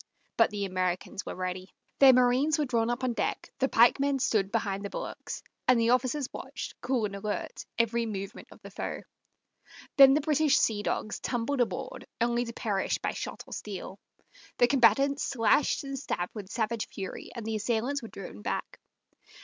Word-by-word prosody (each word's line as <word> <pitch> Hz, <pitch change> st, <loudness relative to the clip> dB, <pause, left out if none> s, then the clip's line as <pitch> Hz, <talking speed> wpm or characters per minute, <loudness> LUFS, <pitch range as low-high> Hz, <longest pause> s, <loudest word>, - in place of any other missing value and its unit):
But 230 Hz, -, +5 dB
the 205 Hz, -1 st, -3 dB
Americans 185 Hz, +1 st, -2 dB
were -, -, -4 dB
ready. 185 Hz, 0 st, -4 dB, 0.3 s
Their 270 Hz, -1 st, +9 dB
marines 255 Hz, +5 st, +3 dB
were 300 Hz, -, +1 dB
drawn 235 Hz, -3 st, +1 dB
up 240 Hz, +2 st, -2 dB
on 250 Hz, -2 st, +1 dB
deck, -, -, -2 dB
the 265 Hz, 0 st, +2 dB
pikemen 275 Hz, +4 st, +4 dB
stood 210 Hz, -6 st, +1 dB
behind 200 Hz, -3 st, -1 dB
the 200 Hz, -, -4 dB
bulwarks, -, -, -6 dB, 0.2 s
and 255 Hz, -2 st, +5 dB
the 230 Hz, +1 st, +3 dB
officers 255 Hz, +2 st, +1 dB
watched, -, -, -6 dB
cool 250 Hz, -4 st, 0 dB
and 200 Hz, -1 st, -4 dB
alert, 205 Hz, +1 st, -4 dB
every 235 Hz, 0 st, +1 dB
movement 195 Hz, -2 st, -6 dB
of -, -, -14 dB
the -, -, -10 dB
foe. -, -, -4 dB, 1.0 s
Then 275 Hz, -1 st, +9 dB
the 305 Hz, -, +2 dB
British 300 Hz, 0 st, +3 dB
sea 210 Hz, -2 st, +2 dB
dogs 210 Hz, 0 st, -2 dB
tumbled 250 Hz, +2 st, -1 dB
aboard, 205 Hz, -7 st, -3 dB
only 240 Hz, +1 st, +1 dB
to 230 Hz, -, -7 dB
perish 205 Hz, -5 st, -1 dB
by -, -, -2 dB
shot -, -, -6 dB
or -, -, -10 dB
steel. 195 Hz, -1 st, -6 dB, 0.6 s
The 245 Hz, -, +6 dB
combatants 275 Hz, +3 st, +4 dB
slashed 250 Hz, +5 st, +2 dB
and 275 Hz, -1 st, -5 dB
stabbed 180 Hz, -9 st, -3 dB
with 205 Hz, -4 st, -8 dB
savage 225 Hz, 0 st, -1 dB
fury, 190 Hz, -2 st, -7 dB
and 235 Hz, -3 st, -6 dB
the 220 Hz, 0 st, -2 dB
assailants 235 Hz, +6 st, -1 dB
were 230 Hz, -, -7 dB
driven 180 Hz, -, -9 dB
back. -, -, -4 dB
230 Hz, 180 wpm, -29 LUFS, 205-260 Hz, 1.0 s, Their